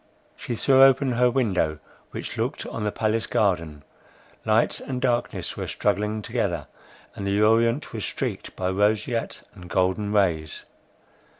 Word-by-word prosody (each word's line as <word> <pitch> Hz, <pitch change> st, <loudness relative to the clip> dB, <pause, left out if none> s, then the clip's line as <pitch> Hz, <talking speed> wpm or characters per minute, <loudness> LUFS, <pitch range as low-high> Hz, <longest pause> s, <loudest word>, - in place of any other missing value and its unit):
She 120 Hz, -, -5 dB
threw 135 Hz, +3 st, +4 dB
open 135 Hz, 0 st, +5 dB
her 125 Hz, +1 st, +3 dB
window, 100 Hz, -11 st, 0 dB, 0.3 s
which -, -, -6 dB
looked -, -, -2 dB
on 115 Hz, -, -5 dB
the 105 Hz, -, 0 dB
palace 110 Hz, +1 st, 0 dB
garden. 85 Hz, -8 st, 0 dB, 0.6 s
Light -, -, +2 dB
and 130 Hz, -2 st, -4 dB
darkness 120 Hz, -2 st, -1 dB
were -, -, -4 dB
struggling 105 Hz, +1 st, -1 dB
together, 100 Hz, -, -2 dB, 0.5 s
and 100 Hz, -, -5 dB
the 100 Hz, +1 st, +1 dB
orient 115 Hz, +5 st, +2 dB
was 110 Hz, -3 st, -4 dB
streaked -, -, -4 dB
by 95 Hz, 0 st, -1 dB
roseate 105 Hz, +4 st, 0 dB
and 90 Hz, -1 st, -12 dB
golden 95 Hz, +3 st, 0 dB
rays. 85 Hz, -7 st, 0 dB
105 Hz, 140 wpm, -25 LUFS, 95-120 Hz, 0.6 s, open